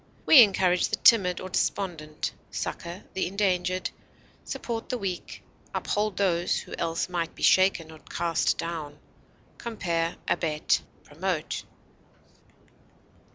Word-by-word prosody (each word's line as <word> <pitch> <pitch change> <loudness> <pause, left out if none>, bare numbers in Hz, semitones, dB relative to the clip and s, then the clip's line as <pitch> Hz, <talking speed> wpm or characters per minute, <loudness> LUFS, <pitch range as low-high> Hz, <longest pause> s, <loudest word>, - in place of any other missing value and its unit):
We 285 - +10
encourage 190 -4 +3
the - - +1
timid 185 -6 +5
or 185 - -6
despondent, 170 -5 -2 0.2
succor 170 +3 -5
the 190 - -1
endangered, 185 -1 0 0.5
support 230 -1 -5
the 250 - -1
weak, 190 -5 -5 0.3
uphold 210 -2 -1
those 175 -3 +1
who - - -11
else 165 +2 -1
might 175 -2 -3
be - - -8
shaken 185 -4 +4
or 160 - -12
cast 170 0 0
down. 155 -3 -5 0.6
Compare 170 -7 -2
ABET; 155 -3 +1 0.2
PROMOTE. 160 +1 -3
180 Hz, 110 wpm, -27 LUFS, 165-195 Hz, 0.6 s, We